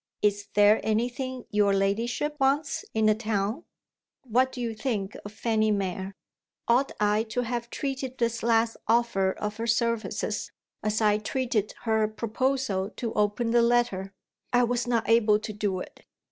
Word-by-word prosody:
"Is 205 -1 +1
there 205 +1 +6
anything 245 +3 -2
your 205 -1 +3
ladyship 230 +9 0
wants 280 +2 +1
in 220 0 +2
the 215 - +6
town?" 215 +5 -2 0.6
What 255 +1 +2
do 255 - -8
you 235 -2 -2
think 215 -4 -3
of 205 - -8
Fanny 220 0 +1
Mere? 195 -1 -2 0.5
Ought 250 +4 +3
I 210 +1 +3
to 230 +2 -2
have 240 0 -3
treated 265 -2 -4
this 235 -1 0
last 230 0 +2
offer 225 -5 +2
of 210 0 -4
her 230 +1 -3
services, 230 0 -1 0.3
as 215 +1 0
I 210 -1 +3
treated 230 -2 -1
her 220 -2 +2
proposal 225 -2 -1
to 230 -2 -3
open 210 +3 +1
the 240 0 +5
letter? 235 -5 +1 0.4
I 245 0 +4
was 245 0 0
not 235 -2 +1
able 225 -2 +5
to 215 0 -6
do 205 -3 -1
it. - - -11
225 Hz, 160 wpm, -27 LUFS, 210-240 Hz, 0.6 s, there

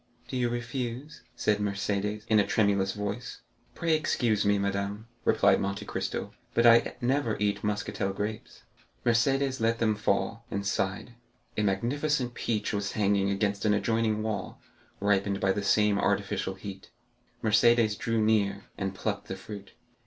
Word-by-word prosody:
"Do - - -4
you 125 -1 +1
refuse?" 120 +3 -4
said 105 -3 +1
Mercédès, 105 +1 -1
in 110 -1 +4
a 100 - +2
tremulous 100 -2 +2
voice. 105 -1 -5 0.3
"Pray 165 -1 +1
excuse 120 -8 +1
me, 100 0 +3
madame," 100 +2 -2 0.2
replied - - +4
Monte 100 +1 -3
Cristo, - - -3 0.2
"but 115 - +4
I 115 0 +6
never 125 -3 +1
eat 105 -1 0
Muscatel 105 -1 -1
grapes." 105 +2 -5 0.4
Mercédès 130 +2 +2
let 115 +1 +2
them 115 -2 +2
fall, 110 +2 0
and 100 0 -3
sighed. 100 +4 -2 0.4
A - - 0
magnificent 125 +6 0
peach 110 -3 -2
was 100 -1 -2
hanging 100 -1 +2
against 100 0 0
an 105 -1 +3
adjoining 110 +1 +1
wall, 110 -2 -4 0.4
ripened 100 -1 +1
by 95 - +2
the 100 - -1
same 105 0 +3
artificial 100 -1 0
heat. 95 0 -9 0.5
Mercédès 110 0 +4
drew 115 +1 -1
near, 105 -2 +1
and 95 -1 -2
plucked 100 0 -3
the 95 - -4
fruit. 100 +1 -9
105 Hz, 150 wpm, -28 LUFS, 100-115 Hz, 0.5 s, I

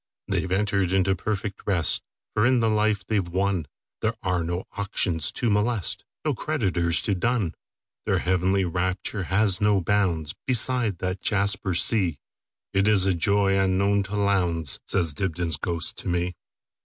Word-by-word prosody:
"They - - 0
've - - -10
entered 100 -2 0
into 95 0 +2
perfect 100 +1 -4
rest; 90 -6 +2 0.3
For 105 - +1
in 125 -1 +3
the 115 -1 +1
life 105 -2 +1
they 105 +1 0
've 90 -3 -4
wonThere 95 +3 -3
are 90 -3 0
no 85 +3 -3
auctions 95 -5 0
to 120 -3 -1
molest, 105 -1 +1 0.2
No 150 - +1
creditors 95 - 0
to 100 - 0
dun. 105 -2 -1 0.5
Their - - +2
heavenly 95 +1 +1
rapture 90 +2 -2
has 95 +1 +1
no 105 -1 +3
boundsBeside 105 - 0
that 90 +2 -4
jasper 100 -2 +1
sea; 90 -5 +4 0.6
It 100 +1 +2
is 100 -3 +4
a 95 - +2
joy 95 +3 +2
unknown 100 +1 +2
to 105 - -4
Lowndes,"Says 90 -4 +1
Dibdin's 85 -2 -2
ghost 85 +1 -1
to - - -8
me. 90 0 -1
95 Hz, 150 wpm, -24 LUFS, 90-105 Hz, 0.6 s, sea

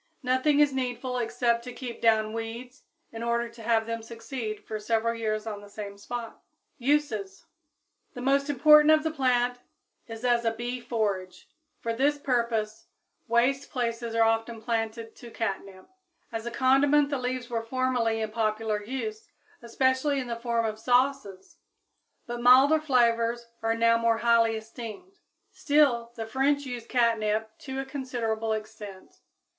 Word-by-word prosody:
Nothing 260 +4 +2
is 295 -2 +4
needful 250 -1 -2
except 235 0 0
to 250 - -6
keep 245 -3 -7
down 220 -1 +3
weeds 230 +3 -7 0.3
in 225 - -7
order 235 0 0
to 230 0 -14
have 225 0 +1
them 230 0 -4
succeed 230 -1 -6
for 215 - -5
several 225 +2 0
years 215 -2 -2
on 210 -2 -5
the 205 - -13
same 205 -1 -7
spot. 230 +3 -7 0.4
Uses. 240 -8 -1 0.7
The 245 - -6
most 275 +2 +2
important 300 +2 +6
use 310 - +8
of 305 - -6
the 320 0 -2
plant 245 -2 +1 0.5
is 225 +1 -7
as 240 -1 +3
a 230 - +2
bee 245 +1 -4
forage; 200 -6 -3 0.3
for 230 - -2
this 285 +5 +2
purpose 235 -5 -1 0.4
waste 250 +4 +1
places 235 -2 -3
are 230 - +4
often 225 0 0
planted 225 0 -3
to 240 - -11
catnip. 195 -4 -5 0.4
As 225 0 -5
a - - -3
condiment 280 +3 +3
the 280 - -1
leaves 250 0 -3
were 230 -1 -1
formerly 245 -3 0
in 215 -1 -3
popular 215 -1 -1
use, 430 - -5 0.3
especially 260 +4 +1
in 260 - -3
the 235 -1 -3
form 235 -1 -1
of 215 0 -3
sauces; 245 -6 0 0.7
but 240 0 -5
milder 265 +5 +6
flavors 235 -4 +2 0.2
are 225 0 +1
now 230 0 +3
more 230 -1 +2
highly 230 -1 +3
esteemed. 230 - -9 0.3
Still, 290 -10 +2
the 225 - -4
French 280 +5 +1
use 245 -3 -6
catnip 220 -3 +1
to 265 -1 -7
a 270 - -3
considerable 230 -5 -2
extent. 215 -3 -8
235 Hz, 155 wpm, -27 LUFS, 225-260 Hz, 0.7 s, use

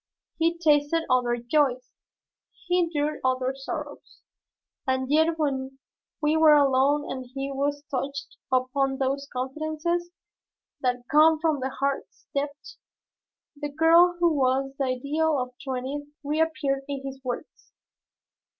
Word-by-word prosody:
He 335 +1 +2
tasted 310 0 +3
other 245 -1 +2
joys. 255 0 0 0.7
He 360 0 +2
endured 305 -3 0
other 255 0 +1
sorrows, 290 +1 -7 0.7
and 260 +1 0
yet 320 +2 +3
when 270 -3 -2 0.5
we 300 +1 +3
were 315 -1 +7
alone 280 +1 +3
and 260 -1 -6
when 275 0 -3
we 280 +2 +1 0.2
touched 275 +1 -4 0.2
upon 265 +1 +1
those 275 +1 -1
confidences 310 +6 -2 0.7
that 245 -1 -1
come 310 +1 +6
from 310 -2 +1
the 260 +1 -2
heart's 275 +1 -3
depths, 285 +1 -4 0.8
the 290 0 -4
girl 330 +4 +5
who 340 -2 +3
was 270 -1 +1
the 275 - +1
ideal 285 +5 0
of 250 -1 -2
his 250 - -18
twentieth 270 +2 -4
year 290 - -30
reappeared 295 -2 0
in 275 -1 -5
his 270 0 -7
words. 250 +4 -6
280 Hz, 130 wpm, -26 LUFS, 265-310 Hz, 0.8 s, were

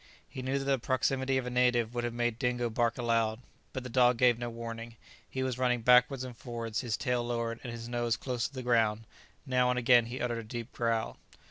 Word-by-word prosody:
He 130 - -7
knew 130 +2 -1
that 135 - -3
the 135 -1 +2
proximity 130 +2 0
of 130 - -1
a 125 - -4
native 120 -2 +2
would 120 -1 -2
have 120 -1 -2
made 120 -1 -1
Dingo 120 -2 0
bark 115 0 +1
aloud; 115 -2 +1 0.3
but 130 - -5
the - - -6
dog 125 0 +4
gave 120 -1 +4
no 120 -1 -3
warning; 115 0 -7 0.3
he 130 - -2
was 130 -1 -2
running 125 -2 +2
backwards 125 +2 +5
and 125 -2 -7
forwards, 115 -2 -4
his 120 -4 -2
tail 125 -1 0
lowered 115 -1 -2
and 120 - -6
his 115 0 -7
nose 120 -1 0
close 125 -3 -2
to - - -19
the 130 - -5
ground; 115 -3 +2 0.4
now 125 -2 +2
and 125 - +1
again 120 -1 +5
he 125 +3 -5
uttered 120 -1 -1
a - - -6
deep 115 +2 -6
growl. 115 -2 -1
120 Hz, 230 wpm, -30 LUFS, 115-125 Hz, 0.4 s, backwards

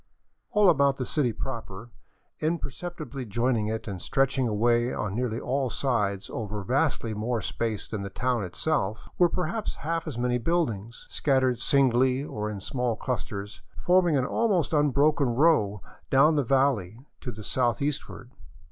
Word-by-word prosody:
All 210 -1 +4
about 140 -3 +2
the 130 - -2
city 130 -2 +1
proper, 115 -2 -6 0.5
imperceptibly 155 -2 -4
joining 115 0 0
it 110 +1 -3
and 95 -4 -5
stretching 135 -1 +1
away 120 +3 +2
on 105 -2 -3
nearly 120 0 -1
all 130 +1 -1
sides 105 -8 -1
over 105 -2 -4
vastly 130 - 0
more 115 +3 -1
space 110 -3 -3
than 105 -3 -4
the 100 - -5
town 125 0 -1
itself, 110 - -2
were 175 -1 +6
perhaps 180 +6 -2
half 165 +1 -1
as 140 -7 -5
many 125 0 +1
buildings, 115 - -1
scattered 130 -4 +1
singly 130 0 +3
or 105 -7 -4
in 105 -2 -5
small 125 +3 -1
clus 125 +1 -3
ters, 100 0 -7 0.2
forming 175 -4 +4
an 130 - +1
almost 195 - +1
unbroken 145 -3 +3
row 115 - +3 0.3
down 150 +4 +5
the 145 - +3
valley 130 -4 +1
to 125 - -5
the 110 -1 -9
south 120 +1 0
eastward. 140 -3 -4
125 Hz, 155 wpm, -27 LUFS, 110-145 Hz, 0.5 s, were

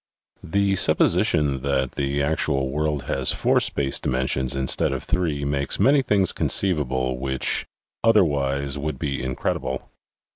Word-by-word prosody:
The 100 +3 0
supposition 70 -6 +3
that 65 -1 0
the 70 +1 -1
actual 70 -2 0
world 75 0 -1
has 65 -1 0
four - - +2
space 70 -1 -1
dimensions 65 0 -1
instead 65 0 0
of 65 - -4
three 80 -5 -1
makes 70 -1 -1
many 140 +1 +4
things 100 -7 +1
conceivable 65 -8 0
which 65 0 -1 0.4
otherwise 70 -10 +2
would 75 +2 -3
be 70 -3 -3
incredible. 65 0 -3
70 Hz, 130 wpm, -23 LUFS, 65-75 Hz, 0.4 s, many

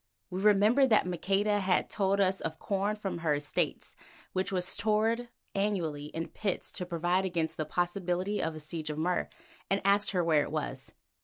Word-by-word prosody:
We 185 +1 -3
remembered 215 +6 +5
that 215 -4 +4
Maqueda 195 +4 +1
had 185 -2 +2
told 200 -1 +1
us 190 -1 +2
of 160 -1 -4
corn 200 +3 -1
from 200 -4 -4
her 160 -3 +1
estates 145 0 -2 0.4
which 185 +1 -1
was 180 -2 0
stored 220 +4 +1 0.2
annually 175 -8 -1
in 165 +2 -5
pits 200 -4 -2
to 180 -3 -4
provide 175 +2 +1
against 170 -4 -1
the 155 - -2
possibility 180 +4 -1
of 160 -1 -2
a - - -6
siege 155 +1 -5
of 150 - -4
Mur, 175 +3 0 0.4
and 195 - +2
asked 200 +1 +4
her 180 -3 +1
where 160 -3 +4
it - - -3
was. - - -4
185 Hz, 180 wpm, -30 LUFS, 165-205 Hz, 0.4 s, remembered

